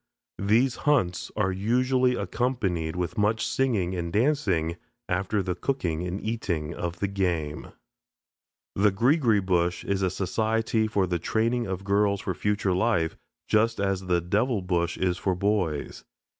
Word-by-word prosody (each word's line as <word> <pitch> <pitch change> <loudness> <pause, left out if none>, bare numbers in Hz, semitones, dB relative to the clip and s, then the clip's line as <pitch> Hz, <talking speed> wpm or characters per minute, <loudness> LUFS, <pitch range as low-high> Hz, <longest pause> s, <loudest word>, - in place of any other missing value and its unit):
These 115 +6 +3
hunts 95 -12 +1
are 105 -3 +1
usually 125 +6 +2
accompanied 95 -14 -1
with 90 +5 -3
much 110 +2 +2
singing 110 -9 0
and 85 -1 -3
dancing, 100 - +1 0.3
after 95 +3 0
the 90 -1 -1
cooking 90 - -2
and 90 +3 -3
eating 95 -9 -2
of 85 0 -4
the 100 - -1
game. 90 -6 -2 1.1
The 105 +1 +3
"Greegree 115 - +3
Bush" 90 -1 +1
is 100 -1 0
a 95 - +2
society 110 +4 0
for 100 -3 +1
the 90 -1 -1
training 115 +6 0
of 95 0 -4
girls 100 0 +2
for 95 - -2
future 100 +2 0
life, 90 -4 +1 0.3
just 110 +1 +2
as 95 -1 -1
the 90 -1 +2
"Devil 100 +4 0
Bush" 85 -2 0
is 90 -1 0
for 95 -2 0
boys. 90 -6 -1
100 Hz, 145 wpm, -26 LUFS, 90-110 Hz, 1.1 s, These